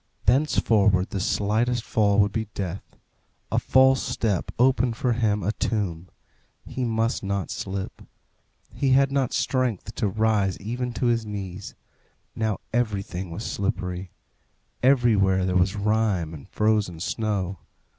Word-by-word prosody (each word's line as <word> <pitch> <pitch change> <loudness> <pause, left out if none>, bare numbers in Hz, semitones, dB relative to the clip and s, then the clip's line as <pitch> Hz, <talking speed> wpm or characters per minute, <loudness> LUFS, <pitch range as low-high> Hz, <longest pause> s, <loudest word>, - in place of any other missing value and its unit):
Thenceforward 105 -7 +3
the 100 - -2
slightest 110 +5 0
fall 105 -3 +2
would 100 0 +2
be 110 0 -2
death; 95 -1 -5 0.6
a - - +2
false 130 0 +4
step 105 -6 -1
opened 125 -2 +2
for 125 -3 +1
him 110 -3 0
a 100 - +1
tomb. 95 -7 -2 0.6
He 130 - -4
must 115 0 0
not 100 -4 -2
slip. 95 0 -5 0.7
He 135 -2 +1
had 135 0 +4
not 135 -3 +1
strength 120 -5 -1
to 110 - -1
rise 105 -2 +1
even 120 +4 -3
to 125 - -2
his 120 -1 +2
knees. 100 -2 -6 0.6
Now 110 -3 -1
everything 100 -6 -2
was 85 +7 -6
slippery; 90 -2 -3 0.7
everywhere 110 -8 +3
there 90 -1 -1
was 90 +2 +2
rime 105 -5 0
and 75 -3 -11
frozen 105 -6 +1
snow. 100 -1 -2
105 Hz, 135 wpm, -25 LUFS, 95-120 Hz, 0.7 s, false